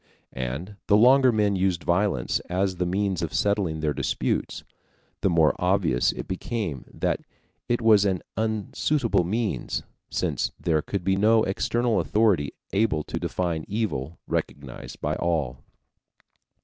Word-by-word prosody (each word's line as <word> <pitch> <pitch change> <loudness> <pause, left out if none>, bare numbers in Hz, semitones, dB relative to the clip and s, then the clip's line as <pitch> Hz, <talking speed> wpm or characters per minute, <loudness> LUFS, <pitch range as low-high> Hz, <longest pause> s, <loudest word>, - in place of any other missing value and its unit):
And 70 +11 -5
the 100 - +5
longer 130 +3 +6
men 105 -3 +2
used 95 -2 0
violence 90 -8 +1
as 95 +1 0
the 90 0 0
means 95 0 0
of 85 - -3
settling 100 -7 +1
their 75 -1 +1
disputes, - - -2 0.6
the 100 - +2
more 80 -3 +4
obvious 90 -8 +2
it - - -7
became 95 - -3
that - - -1 0.5
it 120 -1 +1
was 110 -3 +6
an 95 -3 0
unsuitable 110 +3 0
means, 105 +4 -2 0.3
since - - -1
there 80 -3 +1
could 100 +4 -4
be 95 +2 +2
no 110 +2 +4
external 115 +4 0
authority 105 -10 +2 0.2
able 100 -7 +2
to - - -4
define 85 -4 -2
evil 90 - -2
recognized 70 -3 -4
by - - -1
all. 75 -7 -1
95 Hz, 135 wpm, -25 LUFS, 80-105 Hz, 0.6 s, longer